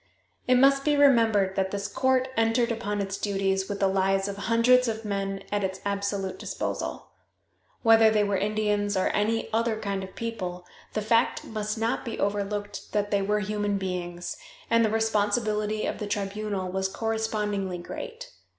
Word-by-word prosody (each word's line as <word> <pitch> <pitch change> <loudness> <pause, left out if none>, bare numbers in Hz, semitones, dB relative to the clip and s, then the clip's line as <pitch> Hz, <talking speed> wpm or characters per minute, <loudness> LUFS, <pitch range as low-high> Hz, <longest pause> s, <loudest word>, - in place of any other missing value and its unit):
It 255 - +5
must 275 +2 +5
be 295 0 +3
remembered 225 -9 +4
that 190 -1 0
this 200 +1 -3
court 260 +2 +1
entered 225 +2 +2
upon 210 -3 -2
its 195 0 -4
duties 195 -1 0
with 200 -1 -3
the 195 - +3
lives 195 0 +1
of 200 - -4
hundreds 230 +5 +4
of 220 -1 -3
men 195 -1 -2
at 205 -1 0
its 190 0 -2
absolute 200 -1 -2
disposal. - - -4 0.7
Whether 225 -1 +7
they 215 -1 +3
were 200 -1 0
Indians 205 0 0
or 185 - +2
any 220 +2 0
other 225 -1 +1
kind 200 -2 -2
of 190 - -10
people, 185 -6 -4 0.3
the 215 - -1
fact 230 +2 +2
must 215 0 -3
not 225 +2 -1
be 230 - -5
overlooked 205 0 -2
that 205 -1 0
they 200 -1 +2
were 210 +2 +1
human 205 0 -1
beings, 175 -2 -4 0.3
and 230 0 +5
the 220 - +3
responsibility 215 0 0
of - - -3
the 210 - -3
tribunal 200 -2 -2
was 190 0 0
correspondingly 210 -3 -2
great. 465 - -8
205 Hz, 170 wpm, -27 LUFS, 195-225 Hz, 0.7 s, Whether